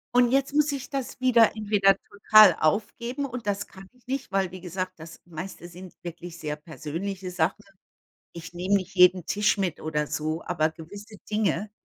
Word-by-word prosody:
Und 245 -1 +5
jetzt 275 +1 +1
muss 295 0 +3
ich 275 -2 -6
das 270 -2 -4
wieder 235 -4 +5
entweder 205 -2 +3
total 205 -2 +6
aufgeben 235 - -1
und 250 -4 -7
das 205 0 -1
kann 190 0 -14
ich 250 -1 -28
nicht, 265 -4 -4
weil 195 -2 0
wie 185 - -9
gesagt, 185 +1 -4
das 160 0 -11
meiste 175 +1 -8
sind 180 +1 -11
wirklich 175 0 -8
sehr 150 -2 -4
persönliche 170 +5 -6
Sachen. 180 +4 -1 0.7
Ich 170 -1 -9
nehme 180 +3 -1
nicht 185 -1 -4
jeden 180 -1 +5
Tisch 210 +1 +1
mit 185 -5 -2
oder 150 -1 -2
so, 155 +2 -3
aber 160 -3 +1
gewisse 200 +7 -11
Dinge, 210 0 0
190 Hz, 175 wpm, -26 LUFS, 170-215 Hz, 0.7 s, total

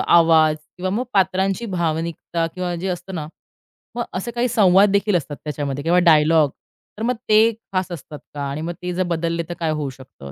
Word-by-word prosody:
आवाज 160 -2 +5 0.2
किंवा 185 +1 -2
मग 235 +6 -1
पात्रांची 195 +4 +1
भावनिकता 165 0 -2
किंवा 180 -1 -3
जे 185 +3 -3
असतं 180 +1 -5
ना, 155 -3 -4 0.7
मग 240 - -1
असे 195 +6 -3
काही 240 +1 0
संवाददेखील 200 -2 +4
असतात 150 -3 -2
त्याच्यामध्ये 145 -2 -3
किंवा 175 +2 +3
डायलॉग, 155 -2 +5 0.5
तर 220 - -4
मग 250 +1 +1
ते 220 +2 +6 0.2
खास 185 -1 -1
असतात 150 -2 -8
का 145 - -5
आणि 145 +3 -4
मग 170 +2 -3
ते 180 0 -3
जर 185 +1 0
बदलले, 170 -1 -1
तर - - -3
काय 160 -2 0
होऊ 150 -3 -2
शकतं, 130 - -12
175 Hz, 185 wpm, -21 LUFS, 155-190 Hz, 0.7 s, ते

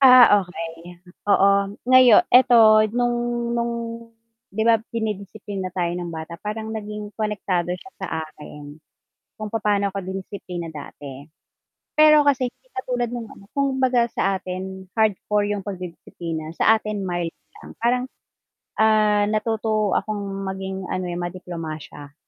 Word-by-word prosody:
Ah, 250 -6 +8
okey. 170 -1 -8 0.3
Oo, 200 0 +4
ngayo 255 -3 +7
eto 250 -1 +7 0.3
nung 240 0 -1
nung, 235 0 0 0.8
'di 220 +3 -2
ba 230 -2 +5
dinidisiplina 205 -3 -4
tayo 175 -1 0
ng 175 -1 -4
bata 165 +1 -7
parang 220 +1 -4
naging 210 -1 -6
konektado 200 -5 -1
siya 255 +7 -15
sa - - -3 0.2
akin. 150 -1 -12 0.6
Kung 215 - -4
papaano 210 -2 +1
ko 195 - -3
dinisiplina 185 -2 -6
dati, 140 -2 -9 0.7
pero 305 -1 +6
kasi 260 -3 +2
hindi - - -43
katulad 245 -10 -2
nung 230 -2 -5
ano, 195 - -14
kung 275 -1 0
baga 250 -2 +2
sa 195 -3 0
atin 190 0 -6
hardcore 210 -1 +1
yung 205 - -3
pagdidisiplina, 170 -4 -6
sa 220 0 +4
atin 210 -2 -4
mild 175 -2 -2 0.3
lang, - - -11
parang, 245 +2 +1 0.8
ah, 210 -1 +4
natuto 215 -1 0
akong 195 -2 -2
maging 190 -1 -5
ano, 185 0 -2
eh, 175 - -4
madiplomasya. 165 -5 -7
205 Hz, 130 wpm, -23 LUFS, 180-230 Hz, 0.8 s, Ah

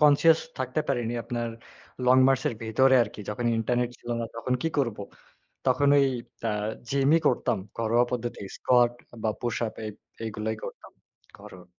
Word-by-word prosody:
conscious 150 +2 +6 0.2
থাকতে 130 +3 -1
পারিনি 120 -3 0
আপনার 120 -1 -3 0.6
লং 130 +1 +6
মার্চ 135 -1 +2
এর 120 - -3
ভেতরে 130 +4 +4
আরকি। 105 -1 -6
যখন 120 +3 -2
ইন্টারনেট 120 +2 0
ছিলো 120 - -5
না, - - -1
তখন 125 +2 -1
কি 165 - +1
করব? 115 -6 0 0.7
তখন 130 +2 +3
ওই 140 - +5 0.4
অ্যা 115 - 0 0.4
জিমই 140 +4 +4
করতাম। 120 -4 +2 0.2
ঘরোয়া 115 +2 +3
পদ্ধতি। 120 -2 -3 0.2
স্কোয়াট 120 -1 +4 0.3
বা 110 - +2
পুশ 120 -2 -1 0.3
এই, 105 - -3 0.4
এগুলোই 110 +1 -3
করতাম। - - -9 0.5
ঘরোয়া। 90 -1 -12
120 Hz, 155 wpm, -27 LUFS, 115-130 Hz, 0.7 s, conscious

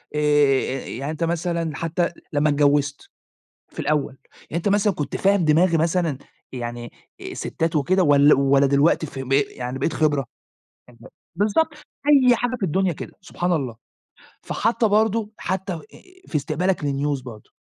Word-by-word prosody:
آآ، - - 0 0.7
يعني 135 +5 -4
أنت 160 +2 -4
مثلًا 170 -2 -1
حتى 170 +1 -1 0.2
لمّا 150 +1 +2
اتجوزت 145 0 +1 0.6
في - - -8
الأول، 145 -3 -1 0.2
يعني - - -15
أنت 175 - 0
مثلًا 205 0 +2
كنت 145 -4 -3
فاهم 195 -2 +2
دماغي 165 +3 +4
مثلًا 165 -3 0 0.3
يعني 120 -1 -6 0.3
الستات 165 0 -3
وكده 185 +6 +2
ول 145 -2 +5
والّا 140 0 +3
دلوقتي 140 +3 +2
ف 135 - -10
ب 135 0 -4
يعني 130 -2 -1
بقيت 155 +4 -1
خبرة؟ 145 -5 +1 0.6
أنت 115 -2 -21 0.4
بالضبط. 210 - +1 0.3
أي 260 -4 +6
حاجة 245 +2 -2
في 230 - -14
الدنيا 185 +2 +1
كده، - - -8
سبحان 180 -1 -2
الله! 135 -8 -2 0.7
فحتى 225 +1 0
برضو 215 +1 +1
حتى 190 0 -3
آآ، 165 - -5 0.5
في - - -9
استقبالك 155 +6 0
لnews 140 -1 -1
برضو، 110 -5 -11
155 Hz, 150 wpm, -22 LUFS, 140-185 Hz, 0.7 s, أي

